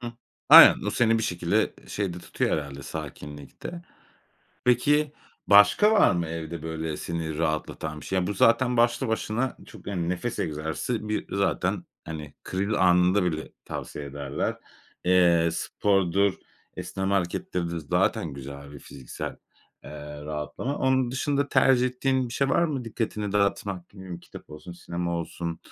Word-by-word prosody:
Hıı. 120 -1 -6 0.4
Aynen, - - +10
o - - +1
seni 115 -1 +3
bir - - -2
şekilde 90 -5 0
şey 100 -4 -3
de 90 - -7
tutuyor - - -2
herhâlde, 70 -2 -3
sakinlikte. 75 - -8 0.8
Peki, 145 +4 +3 0.3
başka 105 - +6
var 220 - +5
mı 85 -2 0
evde 80 0 -6
böyle 80 -1 -4
seni 80 -2 -4
rahatlatan 80 -1 -2
bir - - -11
şey? 95 -1 0
Bu 100 - -1
zaten 120 +5 +3
başlı 120 +2 +2
başına 110 +3 -1
çok, - - -14
hani, 90 -4 -2
nefes 90 +6 -3
egzersizi, 80 - -3
bir 105 - -2
zaten, 100 0 0 0.2
hani, 75 -2 -7
kriz 100 +3 -2
anında 90 +1 +4
bile 80 -3 -3
tavsiye 75 - -6
ederler. 70 0 -3 0.5
Eee, 85 -2 +4
spordur, 95 0 +1 0.4
esneme 95 +1 -2
hareketleridir 85 -2 -2
zaten 80 +1 0
güzel 70 +1 -9
bir 70 - -9
fiziksel 65 -2 -8 0.5
eee, 75 0 -9
rahatlama. 75 - -4
Onun 130 -2 +2
dışında 140 +2 0
tercih 130 -2 +4
ettiğin 130 0 0
bir - - -9
şey 140 - +1
var 170 - +3
mı? 140 -6 -2
Dikkatini 105 -2 -3
dağıtmak 100 -2 -1
Ne 95 - -12
bileyim, 90 -2 -8
kitap - - -13
olsun, 75 +4 -9
sinema 85 0 -4
olsun, 85 0 -5
90 Hz, 145 wpm, -26 LUFS, 80-115 Hz, 0.8 s, Aynen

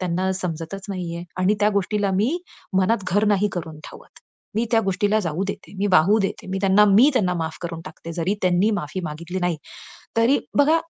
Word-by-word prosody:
त्यांना 185 +1 0
समजतच 170 +3 -5
नाहीये. 175 -3 -4 0.2
आणि 195 +3 +3
त्या 210 +1 +4
गोष्टीला 200 +1 -1
मी 235 - +1 0.4
मनात 195 +1 +1
घर 205 +2 +3
नाही 205 +2 +1
करून 160 -3 -6
ठेवत. - - -15 0.4
मी 230 - +2
त्या 225 - +4
गोष्टीला 205 +1 +1
जाऊ 170 0 -2
देते, 200 - -7
मी 205 - +1
वाहू 185 +6 +5
देते. 195 - -3
मी 190 - -2
त्यांना, 200 +1 +5
मी 255 +9 +7
त्यांना 185 -8 +1
माफ 160 -1 -3
करून 165 -1 -5
टाकते. 165 -2 -9
जरी 175 +4 -1
त्यांनी 185 +4 +3
माफी 185 0 -4
मागितली 170 +4 -5
नाही. 175 -2 0 0.6
तरी 235 +5 +4 0.2
बघा, 310 +3 +5
190 Hz, 185 wpm, -23 LUFS, 170-210 Hz, 0.6 s, मी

